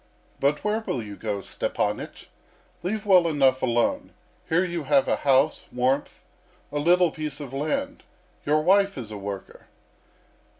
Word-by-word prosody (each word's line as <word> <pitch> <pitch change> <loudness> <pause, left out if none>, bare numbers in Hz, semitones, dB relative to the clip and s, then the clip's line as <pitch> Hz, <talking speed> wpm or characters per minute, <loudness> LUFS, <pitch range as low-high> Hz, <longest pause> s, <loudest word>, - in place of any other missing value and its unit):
"But 145 +2 +1
where 210 +1 +1
will 130 - -3
you 105 -1 -8
go, 105 -1 -3
Stepanych? - - -3 0.6
Leave 210 +4 -3
well 185 -4 +5
enough 135 -4 +3
alone. 120 -2 0 0.4
Here 180 +3 +3
you 170 -2 -3
have 140 -1 +3
a - - +1
house, 140 +2 +2
warmth, 130 +3 -1 0.5
a 145 - -1
little 175 +2 +4
piece 150 -2 -5
of 140 -3 -8
land. 275 - -2 0.4
Your 150 +1 +2
wife 195 +2 +3
is 115 -4 -6
a 105 - -6
worker." 100 -1 -7
145 Hz, 145 wpm, -25 LUFS, 130-180 Hz, 0.6 s, well